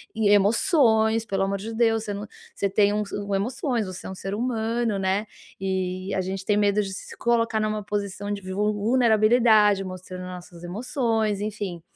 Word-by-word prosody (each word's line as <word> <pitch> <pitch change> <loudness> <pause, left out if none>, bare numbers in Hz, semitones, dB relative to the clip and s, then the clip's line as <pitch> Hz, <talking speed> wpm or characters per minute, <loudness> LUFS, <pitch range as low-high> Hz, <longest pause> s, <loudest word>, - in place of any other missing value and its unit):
e 215 -2 +2
emoções, 220 - +3
pelo 195 -2 -1
amor 195 0 -1
de 225 +3 -6
Deus, 225 -1 +2
você 205 - -3
não 200 +1 -5 0.3
você 200 - 0
tem 200 +1 +3
o 210 0 0 0.3
um 195 - +1
emoções, 235 +2 -1
você 185 0 -7
é - - -6
um 190 - -6
ser 195 +2 -5
humano, 230 -2 -1
né. 195 +2 0 0.3
E 190 0 -2
a 190 - +1
gente 190 +1 -4
tem 210 -1 +2
medo 205 0 +3
de 195 - -4
se - - -8
colocar 230 -2 +1
numa 215 -1 -1
posição 205 0 -3
de 200 - -5
vul 210 +2 +1
vulnerabilidade, 215 -2 +4
mostrando 185 0 -7
as 180 - -7
nossas 175 -1 -12
emoções, 220 +1 -1
enfim. 205 -5 -4
210 Hz, 185 wpm, -25 LUFS, 195-225 Hz, 0.3 s, vulnerabilidade